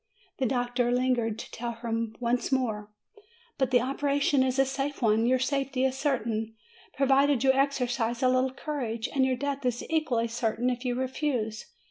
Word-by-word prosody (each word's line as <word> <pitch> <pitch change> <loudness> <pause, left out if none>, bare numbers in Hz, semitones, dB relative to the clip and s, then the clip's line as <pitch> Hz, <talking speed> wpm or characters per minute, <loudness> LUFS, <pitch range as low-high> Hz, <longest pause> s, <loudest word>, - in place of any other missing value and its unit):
The 260 - +2
doctor 245 0 0
lingered 245 -3 +1
to - - -8
tell 235 0 -4
her 230 0 -2
once 245 +1 0
more: 220 -6 -1 0.7
"But 265 -2 +2
the 250 -2 +4
operation 280 +1 +1
is 260 0 +1
a 270 - +4
safe 275 +2 -3
one; 225 -1 +3
your 255 +1 +4
safety 270 0 0
is 260 0 0
certain, 225 -6 -1 0.4
provided 275 -1 +3
you 265 0 +5
exercise 250 -3 0
a - - +5
little 255 +1 +3
courage! 250 -6 -3
And 265 -2 +3
your 260 - +1
death 280 +1 -3
is 245 -1 -1
equally 270 -8 +1
certain 235 +1 0
if 245 0 -4
you 245 -1 0
refuse!" 255 -4 -2
255 Hz, 170 wpm, -28 LUFS, 235-270 Hz, 0.7 s, you